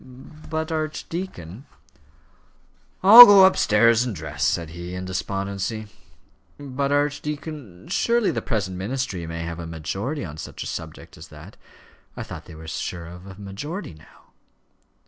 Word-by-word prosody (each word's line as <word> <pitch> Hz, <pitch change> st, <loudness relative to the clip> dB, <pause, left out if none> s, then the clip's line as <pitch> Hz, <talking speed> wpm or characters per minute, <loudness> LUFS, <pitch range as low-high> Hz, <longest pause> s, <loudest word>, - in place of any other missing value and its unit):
"But, 160 Hz, +1 st, -3 dB
archdeacon 155 Hz, -, -5 dB, 0.7 s
" 65 Hz, -, -37 dB
"I'll 230 Hz, +5 st, +12 dB
go 200 Hz, -2 st, +8 dB
upstairs 115 Hz, -, +4 dB
and 120 Hz, -5 st, -4 dB
dress," 75 Hz, -2 st, -5 dB
said 85 Hz, -2 st, 0 dB
he, 85 Hz, +2 st, -7 dB
in 90 Hz, 0 st, -5 dB
despondency. 100 Hz, +3 st, -4 dB, 0.7 s
"But, 140 Hz, 0 st, -3 dB
archdeacon, 145 Hz, -, -3 dB
surely 235 Hz, -2 st, +1 dB
the -, -, -3 dB
present 100 Hz, -6 st, -3 dB
ministry 100 Hz, -4 st, -4 dB
may 85 Hz, 0 st, -5 dB
have 85 Hz, 0 st, -6 dB
a 85 Hz, -, -6 dB
majority 95 Hz, -, -4 dB
on 75 Hz, -2 st, -9 dB
such -, -, -7 dB
a -, -, -9 dB
subject -, -, -8 dB
as -, -, -11 dB
that; -, -, -13 dB, 0.6 s
I -, -, -4 dB
thought -, -, -9 dB
they -, -, -12 dB
were 80 Hz, +1 st, -11 dB
sure 85 Hz, +2 st, -5 dB
of 90 Hz, +3 st, -12 dB
a 100 Hz, -, -10 dB
majority 105 Hz, -, -7 dB
now." 75 Hz, -1 st, -20 dB
100 Hz, 145 wpm, -23 LUFS, -, 0.7 s, I'll